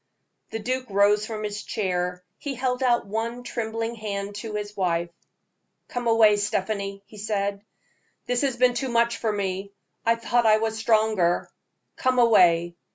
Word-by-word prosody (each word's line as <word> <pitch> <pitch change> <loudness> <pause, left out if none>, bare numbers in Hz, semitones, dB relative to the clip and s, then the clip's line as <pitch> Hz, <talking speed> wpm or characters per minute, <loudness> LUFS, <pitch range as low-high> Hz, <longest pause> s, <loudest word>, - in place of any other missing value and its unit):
The - - -4
duke 255 +3 -2
rose 205 +2 +3
from 215 -1 -5
his 210 0 -3
chair; 180 -4 -2 0.2
he 280 -2 -4
held 250 0 -1
out 245 -2 +2
one 230 +4 -3
trembling 225 -1 -3
hand 205 -2 -4
to 215 0 -6
his 210 0 -4
wife. 170 -3 0 0.8
"Come 245 -1 -3
away, 220 -2 +5
Stephanie," 200 -1 -2
he 210 - -13
said; 200 -1 -2 0.6
"this 245 0 0
has 270 -4 0
been 250 0 +4
too 255 +2 -2
much 235 0 +2
for 225 - -1
me. 195 -1 -3 0.3
I 230 0 +3
thought 230 0 +1
I 215 0 +6
was 220 0 -1
stronger. 220 -5 +2 0.5
Come 255 -1 +1
away! 175 -8 +5
215 Hz, 160 wpm, -25 LUFS, 200-235 Hz, 0.8 s, I